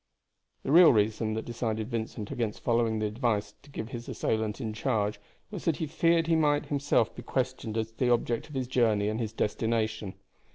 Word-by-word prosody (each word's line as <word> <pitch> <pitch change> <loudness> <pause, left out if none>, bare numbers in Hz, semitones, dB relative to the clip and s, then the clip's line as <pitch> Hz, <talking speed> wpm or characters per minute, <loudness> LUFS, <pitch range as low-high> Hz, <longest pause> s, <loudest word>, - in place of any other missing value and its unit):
The - - -2
real 170 +1 +9
reason 110 0 +1
that 110 - -3
decided 110 -1 -3
Vincent 110 -2 -4
against 115 -3 -3
following 115 -2 +2
the 110 - -1
advice 105 -2 -1
to 145 - -18
give 115 -5 -6
his 120 -2 -7
assailant 110 0 -1
in 110 -4 -3
charge 110 -3 -1 0.3
was 200 -5 -6
that 165 -3 +2
he 160 - -2
feared 165 +2 +2
he 165 - +1
himself 145 -5 +2
might - - -26
be - - -5
questioned 125 -4 -2
as 110 0 -2
to 110 - -33
the 125 - +2
object 120 +2 0
of 150 - -10
his 130 -1 -1
journey 110 -5 +2
and 110 +1 -2
his 110 -3 -2
destination. 110 -2 -1
115 Hz, 200 wpm, -29 LUFS, 110-130 Hz, 0.3 s, real